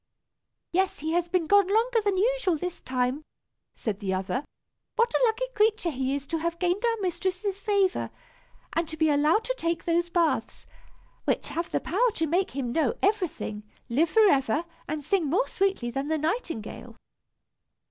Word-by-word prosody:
"Yes, 375 +2 +1
he 315 +2 -3
has 345 +1 +1
been 350 -1 +1
gone 405 +2 +5
longer 455 +3 +2
than 405 -2 +1
usual, 425 -4 +2
this 360 +3 -4
time," 255 +3 -1 0.5
said 210 -3 -3
the 190 -3 -1
other. 195 +8 -2 0.5
"What 470 0 +2
a - - +2
lucky 455 +3 0
creature 425 -5 +2
he 265 0 -1
is 280 -1 -4
to 325 +2 -2
have 335 +1 -2
gained 360 +4 0
our 465 -1 +2
mistress's 375 +2 -2
favor, 400 -3 +1 0.6
and 330 0 0
to 315 - -6
be 315 -1 +3
allowed 300 +9 +3
to - - -1
take 335 0 -1
those 345 0 +1
baths, 340 -1 0 0.6
which - - 0
have 330 +4 -3
the - - 0
power 470 +9 +2
to 325 - 0
make 360 +5 +1
him 255 -3 -3
know 290 -2 +1
everything, 365 - 0 0.3
live 300 +8 +2
forever, 310 - +3 0.2
and 300 0 -3
sing 330 +1 +1
more 400 - +2
sweetly 385 -12 0
than 270 +3 -3
the 315 +1 +1
nightingale." 310 - -3
340 Hz, 170 wpm, -27 LUFS, 290-400 Hz, 0.6 s, gone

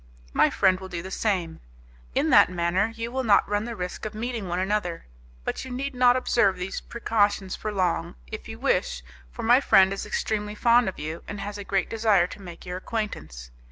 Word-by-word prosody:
My - - +4
friend 185 -1 +3
will 190 0 -8
do 170 -2 -5
the 190 - -8
same. 185 -8 -1 0.6
In - - +2
that - - +7
manner 180 +4 0
you 230 +1 -4
will 260 +1 -1
not 210 -4 +4
run 205 +1 -1
the 235 -1 -5
risk 180 -2 -5
of 215 0 -5
meeting 230 -2 -3
one 175 0 -2
another, 185 -3 -1 0.4
but - - -3
you 260 - -8
need 270 +3 -3
not 250 -1 +5
observe 235 -6 +2
these 180 +2 -4
precautions 205 -4 0
for 215 - -4
long, 185 -4 -1
if - - -8
you - - -7
wish, - - 0 0.3
for - - -8
my 240 +4 +5
friend 190 -6 +5
is 195 - -5
extremely 210 -1 -2
fond 235 0 +4
of 190 - -9
you, 155 +2 -5
and 205 - -6
has 205 +1 -5
a - - -5
great 195 -1 0
desire 215 -5 +3
to 190 - -9
make 175 -3 -10
your 180 0 -4
acquaintance. 80 - -5
200 Hz, 210 wpm, -26 LUFS, 180-225 Hz, 0.6 s, that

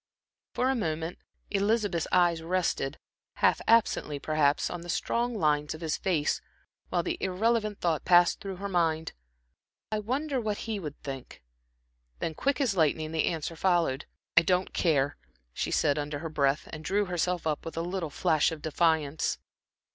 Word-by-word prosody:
For 255 +1 +2
a - - 0
moment 165 -5 -2 0.3
Elizabeth's 200 -4 +1
eyes 175 -2 +3
rested, 165 -5 -1 0.4
half - - +3
absently 220 -9 +3
perhaps, 150 0 +2
on 175 - -5
the 175 - -10
strong 235 +7 0
lines 150 -5 +1
of 155 - -11
his 160 -2 0
face, 170 -7 0 0.5
while - - +1
the 350 0 -2
irrelevant 215 +2 0
thought 160 -4 +1
passed 175 -1 +5
through 195 -3 -5
her 200 +2 -5
mind: 165 -4 0 0.8
"I 215 - 0
wonder 260 +5 -1
what 210 -2 -1
he 220 -2 -2
would 150 -5 -7
think." 135 - -7 0.7
Then, 160 - -3
quick 270 - 0
as 250 -8 +1
lightning, 155 -1 +1
the 160 -1 +1
answer 165 0 -2
followed. 165 -6 +1 0.3
"I 170 - +9
don't 180 +2 +1
care," 145 -5 +1 0.4
she - - -2
said, 145 +1 +2
under 145 0 -3
her 160 +3 -5
breath, 140 -1 +1
and 155 0 -6
drew 205 +4 +1
herself 180 -1 -1
up 155 -2 -1
with 165 - -7
a - - +1
little 175 -1 -3
flash 155 +2 +2
of 160 -2 -7
defiance. 160 -2 +1
170 Hz, 165 wpm, -29 LUFS, 155-200 Hz, 0.8 s, I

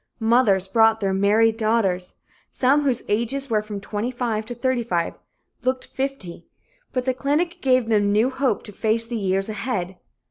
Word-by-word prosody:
Mothers 220 -5 +3
brought 225 +2 +4
their 195 -2 0
married 215 +3 +3
daughters. 215 -5 0 0.4
Some 275 +3 +3
whose 265 -4 0
ages 235 +5 -1
were 215 -1 +2
from 210 -1 -6
25 220 +1 -3
to 245 - -6
35 235 -8 -1 0.5
looked 255 0 -1
fifty, 265 -12 -5 0.4
but 255 -1 -2
the 260 - +1
clinic 295 +6 -1
gave 255 -3 +2
them 205 -2 +2
new 220 +5 +2
hope 265 0 0
to 210 - -10
face 220 +2 0
the 235 +1 -5
years 195 0 0
ahead. 200 -4 -4
225 Hz, 155 wpm, -23 LUFS, 205-255 Hz, 0.5 s, brought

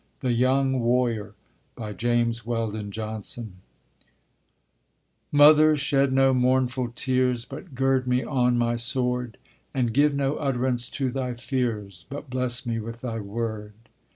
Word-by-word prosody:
THE 130 - 0
YOUNG 130 +2 +2
WARRIOR 115 -4 0 0.6
JAMES 120 -1 0
WELDON 110 -3 -3
JOHNSON 110 -1 -6 1.7
Mother, 150 +1 +7
shed 140 -1 +2
no 135 0 +4
mournful 130 -1 +1
tears, 125 -2 +1
But 145 +1 -10
gird 135 0 +1
me 125 +1 +1
on 125 -3 +1
my 120 0 +1
sword; 125 0 0 0.4
And 120 -4 0
give 145 +2 +3
no 140 +1 0
utterance 125 -3 -1
to 135 -2 -2
thy 125 -1 -3
fears, 110 - -3
But 140 -1 -8
bless 125 0 -1
me 115 -1 -2
with 115 +2 -7
thy 115 -3 -4
word. 105 0 -4
125 Hz, 125 wpm, -25 LUFS, 115-130 Hz, 1.7 s, Mother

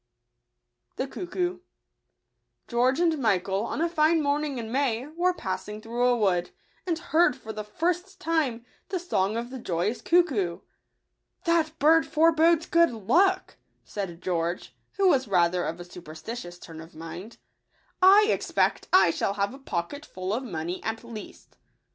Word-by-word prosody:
®&e 260 - -1
<g£ucfcoo. 360 +4 -3 1.1
j^EORGE 255 +4 +2
and 335 -2 +2
Michael, 195 -4 +1
on 295 - -3
a 335 - +3
fine 325 0 +3
morning 290 -1 0
in 225 -2 -5
May, 255 -2 0
were 345 +5 0
passing 210 - -5
through 235 +3 0
a 245 -1 +3
wood, 180 -5 +1 0.4
and 335 -2 0
heard 340 -4 +2
for 220 - -8
the 215 0 -5
first 350 - -2
time 290 -8 -1 0.2
the 375 - -1
song 220 - -1
of 240 +1 -4
the 260 - -6
joyous 185 +2 -2
cuckoo. 265 - +2 0.4
" - - -49
That 325 -2 +1
bird 320 +2 +4
forebodes 325 +1 +4
good 335 +1 +4
luck," 370 - +1 0.3
said 185 -4 -6
George, 175 0 -2 0.2
who 395 -1 +2
was 270 -8 +3
rather 175 -2 +2
of 165 +2 -4
a 175 - -8
superstitious 175 +3 -8
turn 165 -2 -10
of 165 +1 -14
mind; 165 +7 -9 0.4
" - - -37 0.2
I 395 +3 +8
expect - - 0
I 370 - +6
shall 195 - -1
have 200 +2 -1
a 270 - -11
poc 175 -10 -3
ketful 200 -10 -5
of 245 - -2
money 175 -7 -5
at 225 +1 -3
least!" 230 -3 -11
245 Hz, 160 wpm, -26 LUFS, -, 1.1 s, I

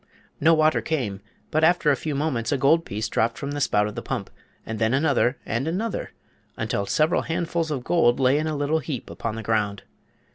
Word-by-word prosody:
No 165 +2 +5
water 155 0 +3
came, 120 -12 -2 0.3
but 155 0 +1
after 170 -2 +4
a - - +3
few 150 +3 -4
moments 135 -6 -1
a 145 - +2
gold 160 +6 +3
piece 105 +2 -3
dropped 115 +1 0
from 140 - -4
the 145 0 -3
spout 105 -6 +2
of 105 - -4
the - - -5
pump, - - -4 0.3
and 110 -1 -5
then 110 +3 +2
another, 135 -3 +2
and 120 +6 -2
another, 195 +6 -2 0.5
until 100 0 -2
several 155 - +2
handfuls 165 0 -2
of 140 -5 -3
gold 130 -6 +3
lay 135 +2 +4
in 155 - -1
a 155 - -2
little 145 +3 +1
heap 140 -4 -5
upon 115 -1 -4
the 115 - -6
ground. 105 -2 0
140 Hz, 210 wpm, -24 LUFS, 115-160 Hz, 0.5 s, No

